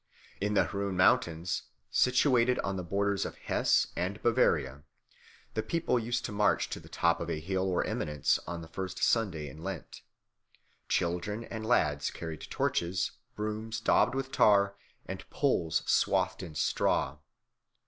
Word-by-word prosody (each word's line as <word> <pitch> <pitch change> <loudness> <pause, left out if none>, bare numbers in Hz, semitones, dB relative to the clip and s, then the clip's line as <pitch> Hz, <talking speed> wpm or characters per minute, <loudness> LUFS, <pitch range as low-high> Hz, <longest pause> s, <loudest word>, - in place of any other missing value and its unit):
In 105 +1 0
the - - +4
Rhön 100 -1 -3
Mountains, 85 -1 +2 0.3
situated 125 -1 +3
on 100 - -2
the 95 - -3
borders 100 +3 0
of - - -5
Hesse - - +2
and 95 +4 -2
Bavaria, 75 - +2 0.7
the 110 - 0
people 165 -3 0
used 120 +2 -2
to - - -4
march 105 0 +2
to - - -4
the - - -15
top 85 0 +2
of - - -4
a 75 - -2
hill 95 +3 -1
or 90 - +1
eminence 75 -2 0
on 85 0 -5
the - - -10
first 95 +1 -5
Sunday 95 -10 +1
in 75 +4 -10
Lent. 95 +1 -6 0.9
Children 90 +6 -1
and 110 -1 -6
lads 75 -11 +2
carried 80 -4 -7
torches, 85 +2 0 0.2
brooms 110 +1 -3
daubed 115 - +3
with 135 0 -3
tar, 100 -1 +4 0.3
and - - -7
poles 80 -2 +1
swathed - - +2
in 85 -5 -8
straw. - - +1
95 Hz, 150 wpm, -30 LUFS, 85-110 Hz, 0.9 s, the